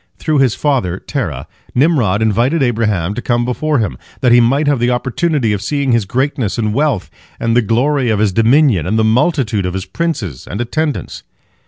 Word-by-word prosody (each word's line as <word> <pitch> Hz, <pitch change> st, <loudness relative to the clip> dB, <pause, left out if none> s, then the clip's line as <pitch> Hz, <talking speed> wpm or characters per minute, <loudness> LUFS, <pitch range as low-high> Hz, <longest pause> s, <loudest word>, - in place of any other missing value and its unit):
Through 155 Hz, -3 st, 0 dB
his 130 Hz, -5 st, +2 dB
father 125 Hz, -, 0 dB
Terah, -, -, -4 dB, 0.3 s
Nimrod 120 Hz, -, +2 dB
invited 120 Hz, +8 st, +1 dB
Abraham 105 Hz, -7 st, 0 dB
to 125 Hz, -, -5 dB
come 120 Hz, -1 st, 0 dB
before 150 Hz, +5 st, -1 dB
him, 100 Hz, -, -2 dB, 0.2 s
that 125 Hz, -, +3 dB
he 120 Hz, 0 st, +6 dB
might 135 Hz, +6 st, +2 dB
have 145 Hz, -3 st, +1 dB
the 120 Hz, +1 st, +1 dB
opportunity 130 Hz, 0 st, 0 dB
of 100 Hz, -, -3 dB
seeing 140 Hz, +4 st, -1 dB
his 115 Hz, -3 st, +2 dB
greatness 130 Hz, -1 st, -1 dB
and 110 Hz, -2 st, -1 dB
wealth, 135 Hz, -7 st, 0 dB, 0.3 s
and 115 Hz, 0 st, 0 dB
the 120 Hz, -, +5 dB
glory 125 Hz, +4 st, +1 dB
of 110 Hz, -, +1 dB
his 105 Hz, -1 st, +1 dB
dominion, 115 Hz, -, +3 dB
and 110 Hz, +4 st, 0 dB
the 110 Hz, -, +2 dB
multitude 115 Hz, -, +1 dB
of 90 Hz, -, -4 dB
his 95 Hz, 0 st, -4 dB
princes 100 Hz, -, -4 dB
and 100 Hz, -, -5 dB
attendants. 150 Hz, +5 st, -3 dB
120 Hz, 190 wpm, -15 LUFS, 105-140 Hz, 0.3 s, he